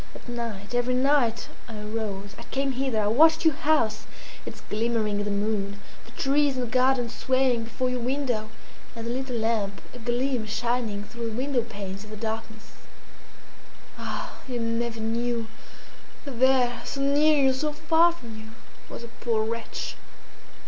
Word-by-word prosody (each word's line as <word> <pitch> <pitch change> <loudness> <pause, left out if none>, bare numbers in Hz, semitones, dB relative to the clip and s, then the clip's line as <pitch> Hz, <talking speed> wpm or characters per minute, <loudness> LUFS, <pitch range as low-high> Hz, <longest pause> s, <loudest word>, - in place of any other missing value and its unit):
At - - -12
night 230 -4 -5
every 245 +1 +2
night 255 -3 +3 0.2
I 225 -2 -7
arose; 210 -2 -4
I - - -10
came 275 0 0
hither; 260 -4 0
I - - +1
watched 315 +9 +5
your 320 - +6
house, 290 -8 +1 0.4
its - - -7
glimmering 215 -1 0
in 205 - -1
the - - -1
moon, 200 -1 -1 0.3
the - - -13
trees 280 0 +3
in - - 0
the - - 0
garden 255 0 +3
swaying 255 -1 +1
before 245 +3 -1
your 250 - -1
window, 245 -3 -1 0.5
and 230 0 -5
the 235 - -2
little 260 0 -2
lamp, 220 -3 0
a 245 - -9
gleam 245 0 0
shining 225 -2 -1
through 235 +2 -5
the 220 - -5
window 260 -1 +1
panes 200 -3 -6
in 215 - -12
the 215 - -7
darkness. 220 0 -5 1.2
Ah! - - -5
you 245 -2 -2
never 230 0 -1
knew 230 +1 0 0.8
that 265 -5 -6
there, 255 -2 +4
so 275 - -4
near 290 +2 +4
you, 265 -1 +5
so 300 +4 -1
far 320 +3 +4
from 235 -10 -10
you, 220 - -10 0.4
was - - -7
a - - -6
poor 230 -1 -1
wretch!" 230 +1 -3
235 Hz, 170 wpm, -27 LUFS, 220-260 Hz, 1.2 s, your